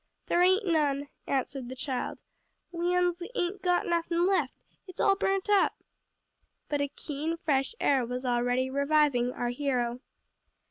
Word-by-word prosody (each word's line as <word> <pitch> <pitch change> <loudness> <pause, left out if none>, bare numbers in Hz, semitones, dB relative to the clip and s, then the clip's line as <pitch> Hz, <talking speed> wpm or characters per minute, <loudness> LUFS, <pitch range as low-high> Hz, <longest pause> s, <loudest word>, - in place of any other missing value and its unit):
"There 345 - +2
ain't 375 +4 +4
none," 290 -4 +1 0.2
answered 265 -2 -2
the 260 - -6
child, 260 -1 -4 0.5
"we 350 +1 0
uns 355 -1 +1
ain't 375 0 -1
got 355 -1 +2
nothin' 340 0 +1
left; 385 0 +1 0.3
it's 370 - -12
all 390 - +4
burnt 390 0 0
up." 410 -1 +4 1.0
But 290 -1 0
a 285 - +1
keen, 300 +3 -4
fresh 285 +4 0
air 270 -3 +3
was 250 +2 -4
already 245 +1 +1
reviving 280 -3 +2
our 245 -1 -2
hero. 245 -2 -1
295 Hz, 145 wpm, -29 LUFS, 260-355 Hz, 1.0 s, ain't